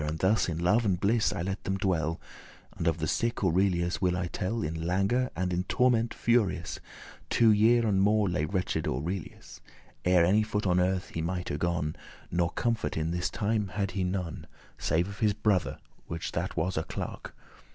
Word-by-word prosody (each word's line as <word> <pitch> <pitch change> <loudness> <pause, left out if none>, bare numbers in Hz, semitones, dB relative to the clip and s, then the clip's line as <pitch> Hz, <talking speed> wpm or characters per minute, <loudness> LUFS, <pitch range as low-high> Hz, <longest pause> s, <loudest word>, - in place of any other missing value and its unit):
And 75 +1 -2
thus 95 +3 +2
in 80 - -2
joy 90 +5 +4
and 100 -7 0
bliss 110 +2 +2
I 95 -3 -3
let 95 +2 -4
them 95 0 -1
dwell, 85 -4 0 0.6
And 85 - -2
of 85 -1 +2
the 80 - -2
sick 115 +9 -1
Aurelius 90 0 +1
will 90 -1 +2
I 90 - -1
tell 105 +6 -2
In 80 +1 -3
languor 100 +8 +1
and 90 0 -1
in 90 +1 0
torment 120 -2 +2
furious 100 -8 0 0.5
Two 115 -2 +5
year 115 +3 +4
and 100 -3 +2
more 105 +1 +3
lay 90 -4 0
wretch'd 95 +2 -1
Aurelius, 80 +7 -5 0.4
Ere 90 -1 +4
any 100 +5 +4
foot 105 -1 -2
on 90 -1 +3
earth 90 +1 0
he 85 - -4
mighte 85 -3 -3
gon; 85 -3 -1 0.4
Nor 85 0 +1
comfort 115 0 -1
in 80 +1 -1
this 90 +1 -1
time 105 -1 -1
had 100 -2 -1
he 95 0 -2
none, 90 -3 -3 0.3
Save 85 +3 +1
of 100 0 -9
his 105 -2 +3
brother, 105 -4 +1 0.3
which 85 -1 -4
that - - -3
was 90 +2 0
a 80 - +1
clerk. - - -6
95 Hz, 190 wpm, -29 LUFS, 85-105 Hz, 0.6 s, Two